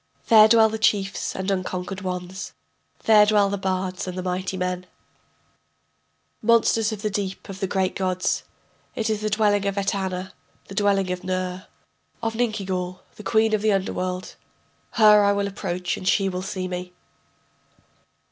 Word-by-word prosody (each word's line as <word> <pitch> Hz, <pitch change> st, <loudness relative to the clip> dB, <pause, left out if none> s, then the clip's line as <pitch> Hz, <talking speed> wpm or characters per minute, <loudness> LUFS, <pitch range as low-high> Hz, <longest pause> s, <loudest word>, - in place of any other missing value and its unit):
There 215 Hz, -1 st, +9 dB
dwell 220 Hz, 0 st, +6 dB
the 220 Hz, 0 st, -4 dB
chiefs 200 Hz, -1 st, 0 dB
and 190 Hz, +1 st, -2 dB
unconquered 185 Hz, 0 st, -3 dB
ones, 185 Hz, 0 st, -5 dB, 0.5 s
There 215 Hz, -2 st, +7 dB
dwell 205 Hz, -2 st, +3 dB
the 200 Hz, -, -1 dB
bards 185 Hz, -1 st, -2 dB
and 185 Hz, 0 st, -5 dB
the 185 Hz, -, -3 dB
mighty 185 Hz, +1 st, -2 dB
men, 180 Hz, 0 st, -3 dB, 1.5 s
Monsters 225 Hz, -1 st, +3 dB
of 215 Hz, 0 st, -6 dB
the 215 Hz, -, 0 dB
deep 195 Hz, -1 st, -4 dB
of 195 Hz, -1 st, -7 dB
the 195 Hz, -, -1 dB
great 190 Hz, -1 st, 0 dB
gods. 185 Hz, -1 st, 0 dB, 0.5 s
It 220 Hz, -1 st, -1 dB
is 215 Hz, -1 st, -2 dB
the 215 Hz, -, -1 dB
dwelling 205 Hz, -1 st, +2 dB
of 200 Hz, 0 st, -2 dB
Etana, 190 Hz, -2 st, -2 dB, 0.4 s
the -, -, -7 dB
dwelling 195 Hz, -2 st, +1 dB
of 180 Hz, 0 st, -4 dB
Ner, 185 Hz, 0 st, -3 dB, 0.5 s
Of 225 Hz, -1 st, -2 dB
Ninkigal, 190 Hz, -6 st, -2 dB
the -, -, -10 dB
queen 220 Hz, 0 st, +2 dB
of 215 Hz, -, +2 dB
the 215 Hz, -1 st, +3 dB
underworld.... 185 Hz, -1 st, -3 dB, 0.6 s
Her 210 Hz, -2 st, +6 dB
I 200 Hz, 0 st, +4 dB
will 200 Hz, 0 st, 0 dB
approach 180 Hz, -2 st, -3 dB
and 185 Hz, -, -6 dB
she 195 Hz, 0 st, +3 dB
will 180 Hz, -1 st, -4 dB
see 185 Hz, -1 st, -4 dB
me. 180 Hz, 0 st, -6 dB
195 Hz, 160 wpm, -24 LUFS, 185-210 Hz, 1.5 s, There